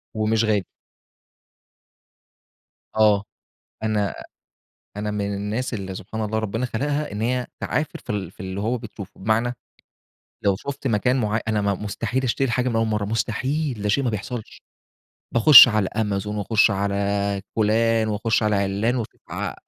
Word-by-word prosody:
ومش 110 +1 +1
غالي. 105 -3 +1 2.3
آه. 105 -2 +4 0.6
أنا 105 -3 0 0.8
أنا 105 0 -2
من 100 -1 -2
الناس 105 +5 -3
اللي 95 -2 -5
سبحان 110 +4 -6
الله 110 +1 -1
ربنا 110 +3 -2
خلَقها 145 +2 -2
إن 105 - -4
هي 125 +1 0
تعافِر 150 0 -2
في - - -11
ال 95 -4 -3
في - - -20
اللي 95 +1 -4
هو 120 +4 -1
بتشوفه، 105 -3 -10
بمعنى، 115 +4 +1 0.9
لو 100 -2 +3
شُفت 140 +4 -5
مكان 120 +3 +2
معيّ 110 0 0
أنا 105 -1 +1
مستحيل 105 +6 -3
أشتري 130 0 0
حاجة 125 +1 +1
من 115 - -2
أول 115 0 +2
مرَّة، 105 -2 -1
مستحيل، 120 +4 -1
ده 105 - -1
شيء 135 +7 +2
ما 125 - +1
بيحصَلش، 110 +2 -6 0.7
باخش 120 +2 +10
على 105 -4 +1
أمازون 105 -1 -1
وأخش 110 +1 +3
على 100 0 -1
فلان 110 +1 +2
وأخش 110 +2 0
على 105 -1 +2
عِلّان 100 +5 0
وأشو 115 - -5
ع - - -3
110 Hz, 150 wpm, -23 LUFS, 100-115 Hz, 2.3 s, باخش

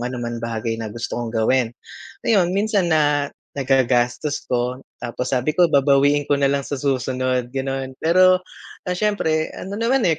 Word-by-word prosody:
ano 125 +1 -3
man 120 -1 -4
bagay 115 0 -3
na 110 - -4
gusto 115 +2 -5
kong 115 -2 -4
gawin. 115 +2 +2 0.6
Ayun, 195 -6 +3
minsan 205 -3 +1
na 145 -3 +2 0.3
nagagastos 130 +1 +1
ko 125 +1 -1 0.2
tapos 125 +1 -4
sabi 130 +4 0
ko 175 0 +4
babawiin 140 0 +3
ko - - +2
na 140 -1 +2
lang 140 -1 -1
sa 145 - -3
susunod, 130 -2 -1
gano'n. 135 0 -3
Pero, 185 +2 +5 0.4
ah, 180 0 -3
siyempre 160 -7 0
ano 200 +2 -6
naman, 245 +3 +2
eh, 160 - 0
135 Hz, 165 wpm, -21 LUFS, 125-160 Hz, 0.6 s, Pero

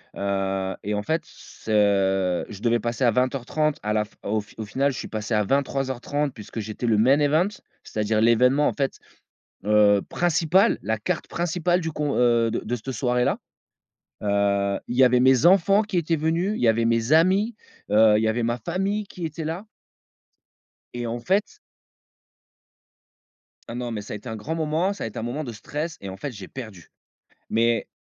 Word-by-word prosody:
heu 95 -1 -2
,et 105 +1 -2
en 105 - -2
fait, 160 +8 0
ce 95 -4 0
je 105 0 -10
devais 120 0 +2
passer 120 +2 -2
à 120 - +5
20:30 135 +5 0
à 105 - -1
la 105 0 +1
f - - -24
au 110 +1 0
f 105 - -11
au 110 - -4
final 135 +6 0
je - - -7
suis - - -6
passé 110 +1 -4
à 105 -1 +3
23:30 135 +2 -1
puisque 110 0 -8
j'étais 110 +3 -5
le 110 -3 +3
main 130 +6 +4
event, 155 +6 +3 0.3
c'est-à-dire 110 0 -1
l'événement 125 +5 +4
en - - -4
fait, 135 -2 -2 0.7
heu, 105 -1 +5
principal, 175 +4 +2
la 110 - -1
carte 105 - -3
principale 175 +1 0
du 160 -1 -3
co 150 -1 -2
heu, 120 -2 +3
de - - -2
de 120 +3 -2
cette 130 +5 -6
soirée-là. 125 -1 0 0.9
Heu, 100 -1 +1
il 120 - -3
y 130 - +7
avait 125 0 +4
mes 130 +2 +5
enfants 195 +3 +5
qui 205 -3 -4
étaient 165 -1 +1
venus, 165 +6 0
il - - -5
y 120 - +4
avait 115 +1 +2
mes 115 +4 +1
amis, 190 +8 +4 0.4
heu, 110 0 +6
il 110 - 0
y - - +2
avait 115 +2 0
ma 120 +1 -1
famille 195 - -2
qui 180 - -8
était 160 0 -4
là 165 +6 -4 1.3
et 120 -1 -4
en 120 +1 -3
fait 190 - -1 2.1
Oh 115 - -6
non, 120 -1 -4
mais 105 -2 -4
ça 100 - -8
a - - -3
été 110 +4 -8
un 110 - -4
grand 150 +10 -4
moment, 160 +5 0
ça 200 - -7
a - - -2
été 110 - -7
un - - -4
moment 130 +6 -3
de 120 - -6
stress, 150 +9 -5
et 100 - -6
en 95 - -8
fait 140 +8 -5
j'ai 100 -5 -9
perdu. 110 -10 -10 0.6
Mais, 115 +1 +1
120 Hz, 195 wpm, -24 LUFS, 105-155 Hz, 2.1 s, y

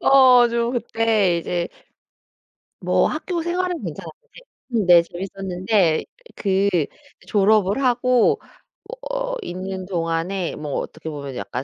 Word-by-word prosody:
어 255 -3 +6
저 235 0 0
그때 225 -6 +1
이제 170 +1 -2 1.1
뭐 - - +2
학교 335 +2 -3
생활은 355 0 -2
괜찮았는데 - - -6 0.7
음 220 -4 +1
네 175 -1 +8
재밌었는데 185 -1 -1 0.3
그 195 0 +1 0.6
졸업을 210 +2 +3
하고 250 -1 +3 0.7
어 - - -2
있는 185 - -5
동안에 170 +1 -2
뭐 150 -2 -6
어떻게 160 0 -7
보면 140 -3 -7
약간 125 +1 -5
195 Hz, 225 characters per minute, -22 LUFS, 175-245 Hz, 1.1 s, 네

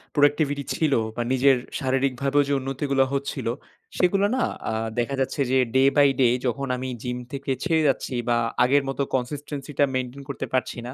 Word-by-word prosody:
productivity 145 -1 +2
ছিল 155 -3 +1 0.2
বা - - -2
নিজের 130 0 +4 0.2
শারীরিকভাবেও 135 +1 +1
যে - - +2
উন্নতিগুলা 135 0 0
হচ্ছিল। 140 -2 -3 0.5
সেগুলা 195 +2 +3
না 260 - +1 0.3
আ - - -2 0.3
দেখা 120 +3 -1
যাচ্ছে 135 +2 -1
যে 130 - +4 0.2
day 135 +1 +5
by 145 -1 +7
day 120 -2 +5
যখন 135 +3 -1
আমি 130 +1 -4
জিম 125 0 -3 0.2
থেকে 140 0 -3
ছেড়ে 165 -3 +2
যাচ্ছি 135 -1 -1 0.2
বা 120 - +3 0.3
আগের 140 +3 +3
মতো 135 - -2
consistency 145 +2 -4
টা 145 - +6
মেইনটেইন 130 +2 -3
করতে 135 -1 -4
পারছি 130 -1 -1
না। 125 - -6
135 Hz, 175 wpm, -24 LUFS, 130-145 Hz, 0.5 s, by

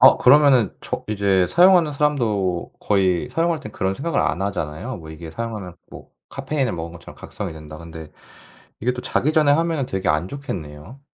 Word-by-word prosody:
어 130 - +8
그러면은 130 -5 +5
저 - - -4
이제 100 -3 +2
사용하는 175 - +5
사람도 110 - 0
거의 95 +2 +1
사용할 165 +2 0
땐 120 -8 -9
그런 95 -1 -1
생각을 160 +9 -1
안 90 +4 0
하잖아요. 100 +4 -3
뭐 80 -2 -11
이게 80 +1 -9
사용하면 105 -5 -6
뭐 - - -12 0.2
'카페인을 135 -2 -2
먹은 85 0 -5
것처럼 85 - -12
각성이 - - -6
된다.' 75 0 -10
근데 80 -2 -10 0.7
이게 125 +3 +1
또 125 - -6
자기 155 - 0
전에 155 -2 +4
하면은 160 -4 +1
되게 95 -4 -2
안 75 +4 0
좋겠네요? 95 - -7
105 Hz, 390 characters per minute, -22 LUFS, 85-140 Hz, 0.7 s, 어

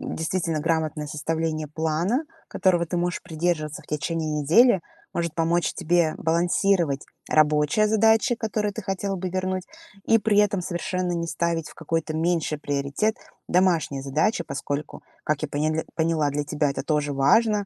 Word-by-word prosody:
действительно 160 -1 -1
грамотное 155 -1 -1
составление 155 +1 -2
плана, 160 - 0 0.2
которого 175 -2 +2
ты 175 - -4
можешь 175 0 -1
придерживаться 160 -3 -2
в - - -22
течение 155 +1 -2
недели, 195 - +5 0.3
может 170 -2 -2
помочь 170 +1 +1
тебе 170 -2 +2
балансировать 170 -2 +1 0.3
рабочие 150 +7 +3
задачи, 220 +3 +3
которые 215 -2 -1
ты - - -6
хотела 195 0 -2
бы 185 0 -3
вернуть, 185 0 -2 0.4
и 225 - +4
при 210 -1 +1
этом 205 -2 +3
совершенно 180 0 -2
не 170 -1 -2
ставить 165 -1 -1
в - - -13
какой-то 165 -1 -2
меньший 160 -2 0
приоритет 145 +10 -1 0.3
домашние 170 -7 +2
задачи, 155 +8 +1
поскольку, 145 0 -5 0.2
как 150 -1 -1
я 155 - -1
поняль 155 +2 -1
поняла, 160 -2 +1
для 145 +1 -2
тебя 145 0 0
это 140 - -3
тоже 150 -2 0
важно, 210 +9 +3
165 Hz, 150 wpm, -25 LUFS, 155-185 Hz, 0.4 s, недели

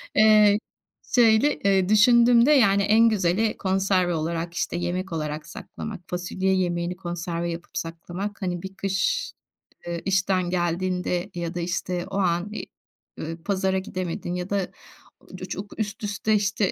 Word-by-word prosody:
Eee, 215 -1 +6 0.6
şöyle, 235 +4 +5
eee, 195 -2 +2
düşündüğümde, 235 +4 +6
yani, 200 -8 +5
en 225 +3 +5
güzeli 210 +2 +1
konserve 190 -2 +1
olarak, 165 +1 -2
işte, - - -2
yemek 180 +2 -3
olarak 155 -1 -4
saklamak. 205 +4 -8
Fasulye 185 +2 -1
yemeğini 175 -1 -1
konserve 175 -1 -3
yapıp 170 +1 -7
saklamak, 175 +5 -5
hani 175 -1 -2
bir 190 0 -7
kış, - - -1 0.6
eee, 170 -1 -3
işten 185 -2 +1
geldiğinde 180 +1 -1
ya 170 0 -3
da, 175 - -2
işte, 180 0 -2
o 195 - -2
an 180 +1 0
i - - -5 0.5
ııı, 165 +1 -6
pazara 190 -1 0
gidemedin 180 -2 -4
ya 180 +1 -4
da 200 -2 0 0.5
ucu - - -10
çok 205 +3 -7
üst 210 +1 -3
üste, 210 +1 0
işte, 200 -1 +1
185 Hz, 145 wpm, -25 LUFS, 175-205 Hz, 0.6 s, Eee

